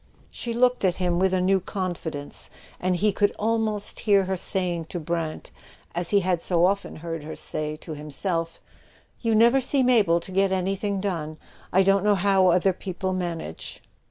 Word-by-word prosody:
She 235 - -5
looked 250 -1 +3
at 180 -2 +3
him 175 -1 0
with 190 0 +3
a 185 - +2
new 190 +1 +3
confidence, 175 -6 -4 0.3
and 180 0 +1
he 210 +4 +2
could 205 +1 +1
almost 220 -1 -1
hear 200 -3 +4
her 190 +1 -1
saying 175 -2 -1
to 175 - -5
Brant, 165 -1 -4 0.4
as 175 0 -1
he 200 -1 +4
had 180 -2 0
so 175 -1 +2
often 200 +2 -1
heard 165 -1 -5
her 155 - -7
say 155 0 -3
to 160 - -10
himself: 165 +3 -2 0.6
"You 230 -2 +1
never 235 +5 +5
seem 260 0 +2
able 205 -9 +4
to 170 - -10
get 195 +1 +2
anything 195 +1 -1
done. 160 -6 -3 0.3
I 190 +2 +5
don't 195 0 +3
know 210 0 +4
how 195 0 +3
other 180 +2 +3
people 185 0 -4
manage." 170 - -5
185 Hz, 180 wpm, -25 LUFS, 170-200 Hz, 0.6 s, never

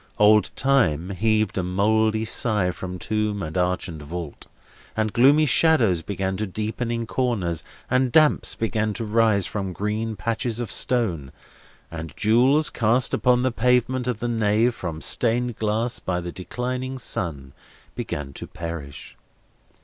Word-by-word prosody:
Old 105 0 +5
Time 100 - +1
heaved 110 0 0
a - - -1
mouldy 110 +4 +1
sigh 105 -5 +2
from 90 +1 -7
tomb 105 +1 -2
and 80 0 -6
arch 90 0 0
and 80 -4 -8
vault; 80 0 -7 0.5
and 110 -1 0
gloomy 140 +6 +5
shadows 120 - +3
began 95 0 -3
to 110 +1 -2
deepen 110 +4 -4
in 115 0 -2
corners; 105 -10 -1 0.2
and 130 0 +1
damps 155 +2 +3
began 110 -2 -1
to 115 - -3
rise 110 -3 +2
from 95 -3 -4
green 110 +3 -2
patches 115 +4 -2
of 120 - -3
stone; 90 - 0 0.6
and 80 -1 -7
jewels, 130 +8 +3
cast 120 +2 +1
upon 125 -1 +2
the 130 - +1
pavement 125 +2 +1
of 120 -4 -2
the 120 - -1
nave 115 +1 +2
from 80 -7 -6
stained 120 0 +1
glass 110 +3 -1
by 90 -1 -2
the 85 0 -6
declining 125 +7 -4
sun, 75 - -4 0.4
began 70 -2 -5
to - - -8
perish. 80 -4 -8
110 Hz, 150 wpm, -23 LUFS, 90-120 Hz, 0.6 s, Old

